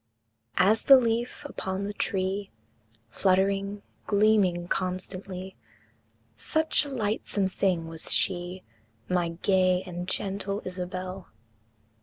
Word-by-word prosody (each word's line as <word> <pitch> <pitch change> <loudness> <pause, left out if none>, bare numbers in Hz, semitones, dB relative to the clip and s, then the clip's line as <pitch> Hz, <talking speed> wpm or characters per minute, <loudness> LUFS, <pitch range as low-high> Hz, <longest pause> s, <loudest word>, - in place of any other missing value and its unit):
As 205 +5 +4
the 275 - +8
leaf 235 -1 -1
upon 190 +1 -4
the 205 +1 -3
tree, 195 0 -1 0.6
Fluttering, 195 +3 +1 0.2
gleaming 200 -4 +3
constantly, 185 +1 -4 0.8
Such 315 -1 +1
a - - -6
lightsome 215 -5 -1
thing 185 -3 0
was 165 0 -3
she, 180 0 +1 0.4
My 175 -2 +1
gay 185 -1 +3
and 180 -1 -6
gentle 200 +1 -2
Isabel! 185 0 -5
190 Hz, 100 wpm, -27 LUFS, 185-205 Hz, 0.8 s, the